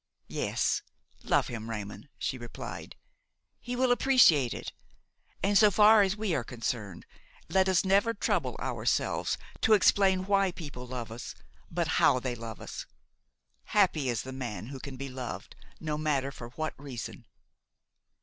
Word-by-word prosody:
"Yes, - - 0 0.4
love - - +2
him, 115 -1 -6
Raymon," 105 +5 -6
she 130 - -3
replied; 120 -1 -8 0.6
"he 245 0 -5
will 255 0 +2
appreciate 240 - +5
it; - - -6 0.7
and, 200 +1 +2
so 210 +1 +7
far 210 +2 +7
as 195 +1 +1
we 210 -4 -1
are 130 - 0
concerned, 115 - -4 0.4
let 190 0 +3
us 185 0 +3
never 200 +4 +3
trouble - - 0
ourselves - - 0 0.2
to 220 - +5
explain 190 -2 +4
why 195 -1 +3
people 140 -8 -8
love 120 -3 -5
us, 115 +2 -7 0.3
but - - -1
how 130 - +5
they 125 -1 -3
love 115 -2 -7
us. - - -7 0.9
Happy 155 -10 +3
the 125 +3 -4
man 120 -3 -5
who 135 -1 -7
can 135 0 -8
be 135 +1 -5
loved, 130 -2 -7 0.2
no 150 -1 -3
matter 140 -3 0
for 120 -3 -9
what 155 +6 -4
reason!'' 130 -6 -7
140 Hz, 150 wpm, -29 LUFS, 120-195 Hz, 0.9 s, so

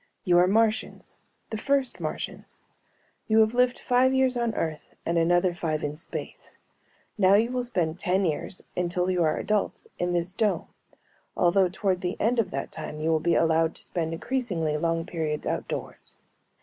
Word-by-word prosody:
You 175 -1 +4
are 180 - +5
Martians, 220 +2 +1 0.4
the 220 - -3
first 275 0 +1
Martians. - - -6 0.7
You 220 - +3
have 220 +1 +3
lived 250 0 +3
five 255 +1 +3
years 260 -1 +3
on 235 -2 -1
Earth 155 -2 -4
and 170 - 0
another 175 +2 +3
five 160 -3 -2
in 145 0 -2
space. 155 - -6 0.6
Now 190 0 +6
you 230 +4 +3
will 250 -1 -1
spend 175 -8 -1
ten 190 +2 +1
years, 160 +3 -3
until 180 +1 0
you 180 -1 +1
are 155 - +1
adults, 210 -1 -1
in 175 0 0
this 175 +1 -1
dome, 205 -5 0 0.7
although 180 +1 +4
toward 185 0 -1
the 180 0 -3
end 235 +2 +2
of 210 -5 +1
that - - -4
time 155 -1 -7
you 160 +1 0
will 160 - +3
be 170 +2 +1
allowed 165 0 +2
to - - -7
spend 165 -3 -3
increasingly 170 -5 -1
long 165 +1 0
periods 155 -3 -3
outdoors. - - -4
180 Hz, 175 wpm, -26 LUFS, 165-220 Hz, 0.7 s, Now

